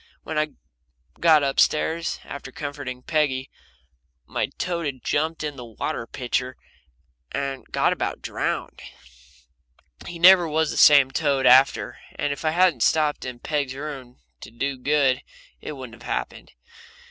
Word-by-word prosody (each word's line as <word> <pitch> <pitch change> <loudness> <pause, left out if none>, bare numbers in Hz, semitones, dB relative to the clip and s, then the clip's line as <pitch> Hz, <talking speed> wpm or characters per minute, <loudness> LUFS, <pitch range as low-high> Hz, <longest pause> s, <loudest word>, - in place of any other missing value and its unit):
When 160 - -5
I 155 -1 -1 0.7
got 160 -3 +5
up 135 -1 0
stairs, 165 +2 +1
after 140 -2 -8
comforting 140 -3 -6
Peggy, 145 -5 0 0.7
my - - -2
toad 170 -3 -2
had 130 -3 -6
jumped 160 +2 -1
in 150 -2 -4
the 125 - -7
water 115 0 -4
pitcher 130 +1 -3 0.7
and 135 -1 -4
got - - +2
about - - -3
drowned - - -3 1.3
he 175 - -7
never 175 0 +7
was 160 0 0
the - - -5
same 140 -3 +7
toad 140 -4 0
after 130 +2 +4 0.2
and 145 -1 -1
if 140 - -9
I 155 - +2
hadn't 170 -5 +3
stopped 150 +2 +2
in 125 -1 -6
Peg's 140 0 -2
room 135 -4 -7 0.2
to - - -10
do 135 +5 -3
good 135 0 +1 0.4
it - - -6
wouldn't 125 -4 -10
have - - -7
happened. - - -4
145 Hz, 145 wpm, -24 LUFS, 130-155 Hz, 1.3 s, never